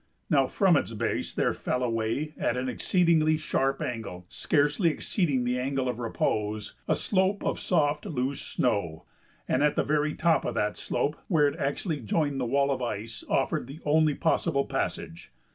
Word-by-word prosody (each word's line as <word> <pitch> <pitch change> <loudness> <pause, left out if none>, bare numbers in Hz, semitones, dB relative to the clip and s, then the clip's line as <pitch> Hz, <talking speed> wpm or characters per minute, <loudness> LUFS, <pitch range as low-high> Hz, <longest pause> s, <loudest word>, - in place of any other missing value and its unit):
Now - - +4
from - - +3
its - - -2
base - - -2
there - - +1
fell 125 - -2
away 115 +6 -1
at 120 - -1
an 130 +1 -2
exceedingly 160 +2 +2
sharp 135 -3 0
angle, 110 -7 -5
scarcely 150 +4 +2
exceeding 150 - 0
the 125 +1 0
angle 135 0 -1
of 125 -1 -2
repose, 110 -2 -2
a - - +3
slope 190 0 +1
of - - -1
soft, 150 -4 +1
loose 135 -1 -2
snow, 90 -10 -1 0.4
and 130 - +1
the 150 0 +2
very 150 +1 0
top 165 -3 +2
of - - -3
that 105 0 0
slope 150 - -1
where 155 -6 +4
it 145 - -4
actually 145 +3 -1
joined 140 +4 -1
the - - 0
wall 140 +3 +2
of 130 -2 -2
ice 115 -1 -4
offered - - 0
the 140 +4 -9
only 155 0 +3
possible 160 -3 +1
passage. 80 - -4
140 Hz, 170 wpm, -28 LUFS, 125-155 Hz, 0.4 s, Now